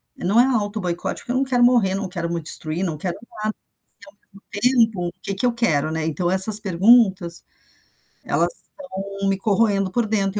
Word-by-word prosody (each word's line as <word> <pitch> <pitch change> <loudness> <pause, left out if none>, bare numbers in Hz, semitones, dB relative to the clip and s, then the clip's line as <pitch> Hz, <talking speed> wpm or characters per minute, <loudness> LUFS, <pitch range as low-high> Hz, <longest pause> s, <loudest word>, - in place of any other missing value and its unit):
não 200 +6 +1
é 245 - +6
autoboicote 205 -8 -2
porque 245 - -6
eu - - 0
não 270 - +2
quero 250 -2 +1
morrer, 230 -6 +3
não 195 -1 -3
quero 170 -2 -4
me 170 - -3
destruir, 155 +2 -4
não 160 -3 -3
quero 175 +4 -4 0.3
nada, 215 0 -1 0.3
mas - - -31
e 200 - -14
ao 200 - -18
mesmo 225 +5 0
tempo, 180 -5 -4
o - - -7
que 200 - -3
que 195 +6 -1
eu 245 - +2
quero, 155 -10 0
né. 160 0 -2
Então, 175 +2 -1
essas 190 +3 +6
perguntas, 190 -2 +3 0.8
elas - - 0 0.5
estão 195 0 -4
me 195 0 +1
corroendo 200 -1 +1
por 240 +3 0
dentro 200 -2 -1
195 Hz, 200 wpm, -21 LUFS, 175-220 Hz, 0.8 s, é